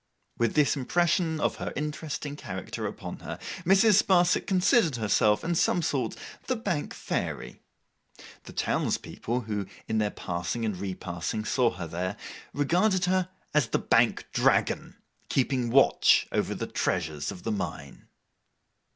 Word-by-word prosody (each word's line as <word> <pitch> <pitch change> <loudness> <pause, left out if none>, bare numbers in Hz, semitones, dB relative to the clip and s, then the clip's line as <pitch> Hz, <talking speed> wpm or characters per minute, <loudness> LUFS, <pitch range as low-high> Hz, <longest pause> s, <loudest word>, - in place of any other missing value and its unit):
With 115 -2 0
this 150 -1 +4
impression 160 +3 +1
of - - 0
her - - -4
interesting 150 -1 -4
character 95 -10 -5
upon - - -7
her, - - -6 0.3
Mrs. 195 +3 +6
Sparsit 180 -2 +3
considered 185 - +3
herself, 105 -1 +2
in 170 - 0
some 170 +1 +2
sort, 130 -7 -1 0.3
the 255 - +1
Bank 195 -10 -3
Fairy. - - -4 0.8
The - - -9
townspeople 120 +2 -1
who, 105 -3 -3 0.2
in 110 - 0
their 105 -1 +1
passing 90 +6 -3
and 105 -3 -1
repassing, 90 +1 -4
saw 125 -1 +3
her 85 -1 -5
there, 90 +5 -3 0.3
regarded 180 +6 +2
her 185 0 +1 0.2
as 150 -5 +3
the - - +1
Bank - - +2
Dragon - - +1 0.3
keeping 130 -2 +1
watch 135 +3 +5
over - - 0
the - - -3
treasures 75 -5 -2
of 90 - -10
the 115 - -1
mine. 95 -6 -5
130 Hz, 140 wpm, -28 LUFS, 105-170 Hz, 0.8 s, Mrs